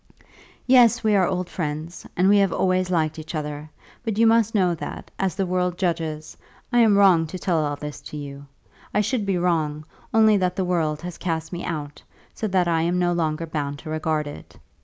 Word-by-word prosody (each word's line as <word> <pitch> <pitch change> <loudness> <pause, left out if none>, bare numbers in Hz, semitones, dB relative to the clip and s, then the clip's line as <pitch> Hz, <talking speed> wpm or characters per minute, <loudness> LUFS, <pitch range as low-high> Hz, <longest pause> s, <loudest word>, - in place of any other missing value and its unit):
"Yes, 245 -2 +5
we 215 -1 +3
are 185 -3 +4
old 180 -1 -2
friends, 160 0 -5
and 180 +2 +4
we 205 +1 +6
have 195 -2 +3
always 185 0 +1
liked 160 -3 0
each 155 +2 -7
other; 150 0 -5 0.3
but 220 -3 -2
you 230 - +5
must 225 -1 +3
know 180 -4 +3
that, 165 - -7
as 190 -4 0
the 195 - 0
world 180 -1 -1
judges, 165 -4 -2 0.4
I 240 - +5
am 220 -4 +5
wrong 180 -5 +5
to 185 - -6
tell 170 -3 0
all 145 -1 -1
this 150 0 -7
to 150 - -7
you. 140 -1 -8 0.5
I 210 - +4
should 215 -1 -1
be 195 -2 +1
wrong, 155 -4 0 0.3
only 220 -1 +5
that 180 -1 0
the 190 - -1
world 165 -4 -1
has 175 -2 -7
cast 160 -1 -3
me 175 - -4
out, 150 -3 -5 0.3
so 220 - -3
that 185 -3 +1
I 165 -1 +2
am 175 +2 0
no 175 -1 +2
longer 165 -1 -1
bound 145 -3 -3
to 155 - -8
regard 155 -1 -1
it. 145 - -10
175 Hz, 210 wpm, -23 LUFS, 155-190 Hz, 0.5 s, we